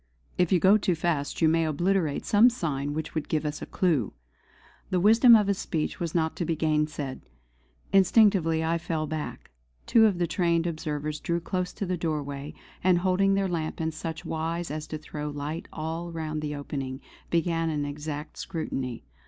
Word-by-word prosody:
If 180 -2 +1
you 185 - +5
go 195 +5 +6
too 185 -3 +1
fast 160 -2 -1
you - - +7
may 165 +1 +3
obliterate 160 0 0
some 220 +4 +6
sign 145 - -3
which 155 -1 -4
would 155 -2 -3
give 155 -1 0
us 150 0 -3
a - - -6
clue!" 155 - +1 0.8
The 185 - +1
wisdom 225 +5 +7
of 210 -2 +4
his 200 -1 0
speech 155 -4 -2
was 170 -1 -3
not 160 -1 +1
to - - -1
be 165 0 0
gainsaid. 150 -3 -1 0.7
Instinctively 190 -4 +4
I 165 +1 +1
fell 160 -2 -2
back; 155 - -6 0.3
two 225 -2 +6
of 200 -4 0
the 175 - +1
trained 170 -1 +1
observers 155 -2 -3
drew 170 +2 -1
close 180 +1 -2
to 200 - -4
the 180 -1 -1
doorway, 145 -3 -3 0.3
and 185 -1 +5
holding 190 +2 +2
their 195 0 +1
lamp 165 -3 -3
in 160 0 -1
such 160 +1 -6
wise 165 +1 -3
as 155 0 -5
to 155 - -4
throw 150 -1 -6
light 145 +3 -5
all 165 +2 -4
round 155 -2 -3
the 150 -1 -3
opening, 135 -2 -5 0.3
began 165 -1 +1
an 150 -2 -1
exact 150 +1 -6
scrutiny. 135 -8 -4
160 Hz, 185 wpm, -27 LUFS, 150-175 Hz, 0.8 s, you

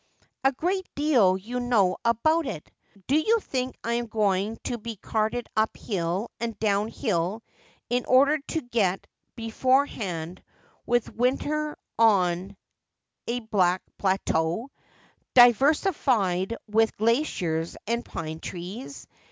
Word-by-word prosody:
' - - -46
A 270 - +5
great 365 +7 -2
deal 250 -11 +4
you 235 +6 -5
know 215 -7 +2
about 305 +8 +2
it! 155 - -6 0.3
Do 275 - +1
you 435 +9 +3
think 255 -9 -3
I 235 - -1
am 240 0 -1
going 210 0 0
to 240 - -3
be 230 +1 -6
carted 220 +4 -2
up 220 0 +1
hill 185 +1 -2
and 230 -1 -3
down 205 -1 +1
hill 210 -2 -2 0.4
in 245 +1 0
order 280 +4 +4
to 320 - -2
get 215 -7 0 0.3
beforehand 225 - 0 0.5
with 240 -1 +1
winter 295 +5 0 0.2
on 190 -3 +3 0.7
a 245 +1 -1
bleak 190 -5 +1 0.2
plateau, 190 +3 0 0.6
diversified 245 - +4
with 220 +1 +2
glaciers 195 - 0
and 235 +2 -1
pine 160 -5 -6
trees 195 +13 -7
225 Hz, 120 wpm, -26 LUFS, 190-255 Hz, 0.7 s, A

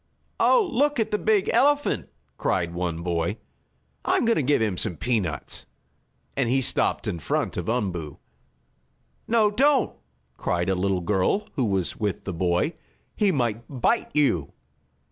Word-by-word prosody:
"Oh, 470 -6 +4
look 290 +1 +2
at 220 0 0
the 210 - +1
big 215 -3 +2
elephant!" 285 +4 +2 0.3
cried 85 -2 0
one 85 -1 -3
boy. 85 +3 -1 0.7
"I'm - - +2
going 230 0 +3
to - - +2
give 145 +2 +2
him 110 -4 0
some 90 -2 -2
peanuts!" 95 - -2 0.7
and 135 -4 +1
he 135 +2 +3
stopped 135 -1 0
in 90 -5 -2
front - - -1
of - - -3
Umboo. 90 - -2 1.1
"No, 220 -2 +3
don't!" 275 +6 +3 0.4
cried 90 +1 -1
a - - +3
little 95 0 0
girl 105 - +1
who 130 -5 0
was 95 -4 0
with 105 -3 -2
the 95 - -4
boy. 90 - +1 0.4
"He 205 -3 +3
might 120 - 0
bite 140 - +1
you." 110 - +2
110 Hz, 150 wpm, -25 LUFS, -, 1.1 s, Oh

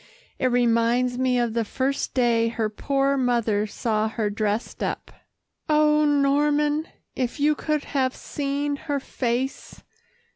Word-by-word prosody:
It 255 - +2
reminds 245 0 +2
me 255 -1 +2
of 240 -2 0
the 230 0 +1
first 265 +5 -2
day 235 -3 +3
her 225 -1 -1
poor 275 +5 0
mother 230 -5 +1
saw 215 +1 -1
her 215 -2 -2
dressed 210 +1 -2
up. - - -3 0.6
Oh! 300 0 +4
Norman, 295 +2 +2 0.3
if 255 +2 -2
you 300 +1 +4
could 300 0 -2
have 265 -2 -1
seen 285 0 -3
her 285 -1 -2
face. 255 0 -3
255 Hz, 135 wpm, -24 LUFS, 230-285 Hz, 0.6 s, Oh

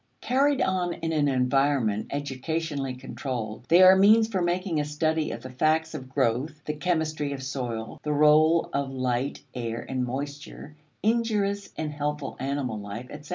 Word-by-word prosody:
Carried 275 +3 +2
on 180 -2 0
in 165 -1 -3
an 150 -2 +2
environment 130 -4 +1
educationally 145 0 -3
controlled, 120 -3 -5
they 175 +3 +7
are 185 +1 +9
means 215 +3 +6
for 195 -5 -1
making 175 -1 0
a - - +1
study 155 +1 0
of 115 - -6
the 130 - -8
facts 155 +4 +1
of 130 0 -7
growth, 135 +3 0
the 150 - -2
chemistry 155 -3 -1
of 135 -1 -6
soil, 120 -4 -4
the 150 - -2
role 155 +2 +4
of 140 -1 -1
light, 130 +1 -2
air, 115 -1 -4
and 130 -1 -1
moisture, 140 +3 -6 0.3
injurious 210 -3 +1
and 155 -1 -3
helpful 150 0 -3
animal 135 -5 -2
life, 105 +4 -7
etc. 150 0 -10
145 Hz, 160 wpm, -26 LUFS, 130-165 Hz, 0.3 s, are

